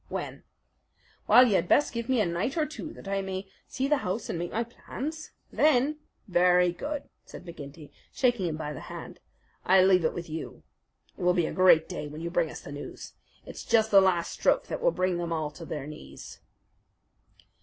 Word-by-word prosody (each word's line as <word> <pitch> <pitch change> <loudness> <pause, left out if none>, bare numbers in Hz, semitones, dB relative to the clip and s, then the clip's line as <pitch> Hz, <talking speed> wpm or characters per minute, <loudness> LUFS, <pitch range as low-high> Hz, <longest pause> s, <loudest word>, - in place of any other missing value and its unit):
"When?" - - -5 0.9
"Well, 250 - +8
you 215 - +1
had 180 -2 +2
best 295 +8 +3
give 235 0 -4
me 260 -2 +3
a - - +2
night 175 - -2
or 310 - +2
two 305 +1 -7
that - - -12
I 195 0 -1
may 190 0 -5 0.2
see 265 +1 -2
the 295 +1 +3
house 190 -1 -3
and 165 - -3
make 175 - -4
my 230 - 0
plans. 300 +6 -7 0.2
Then 300 0 +3 0.2
" - - -49
"Very 180 -1 +4
good," 285 +10 -4 0.2
said 180 - -12
McGinty, 150 -2 -10 0.2
shaking 240 -8 +1
him 155 -2 -3
by 150 -1 -4
the 135 - -7
hand. - - -9 0.4
"I 185 0 +5
leave 185 -2 +4
it 160 - 0
with 170 -1 -5
you. 160 0 -7 0.5
It - - -12
will 180 0 +3
be 175 -3 +2
a - - -4
great 180 -3 +5
day 175 -5 -5
when 150 +2 -8
you 170 0 -4
bring 170 -2 +1
us - - -8
the - - -10
news. 145 0 -8 0.3
It's - - -8
just 220 -1 +2
the 195 -1 +8
last 180 -3 +1
stroke - - +1
that - - -4
will - - +4
bring 185 - 0
them 170 -1 -3
all 155 -2 -2
to 165 +3 -10
their 150 -3 -5
knees." 150 +1 -10
185 Hz, 210 wpm, -28 LUFS, 165-235 Hz, 0.9 s, Well